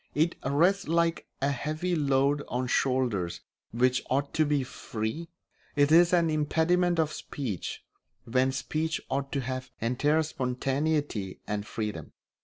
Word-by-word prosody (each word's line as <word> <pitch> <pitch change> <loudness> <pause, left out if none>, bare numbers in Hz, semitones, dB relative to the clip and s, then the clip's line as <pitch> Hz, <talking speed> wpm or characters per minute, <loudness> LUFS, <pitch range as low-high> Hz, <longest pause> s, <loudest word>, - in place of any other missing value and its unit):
It 160 +3 +2
rests 175 +9 +2
like 165 +1 +1 0.2
a 140 - +3
heavy 155 +6 -2
load 140 -1 +2
on 125 +1 -1
shoulders 125 -9 0 0.3
which 125 +2 +2
ought 140 +2 0
to 155 - +3
be 145 -2 +2
free; 125 +5 -5 0.5
it 145 0 +4
is 170 +1 +7
an 170 -3 +3
impediment 165 +3 +2
of 155 -2 +1
speech 115 - -5 0.4
when 130 +2 +2
speech 155 +5 -2
ought 140 0 -1
to 140 - -1
have 130 0 -4
entire 145 +7 +2
spontaneity, 135 -5 -1
and 105 0 -3
freedom. 105 -9 -4
140 Hz, 135 wpm, -28 LUFS, 125-160 Hz, 0.5 s, is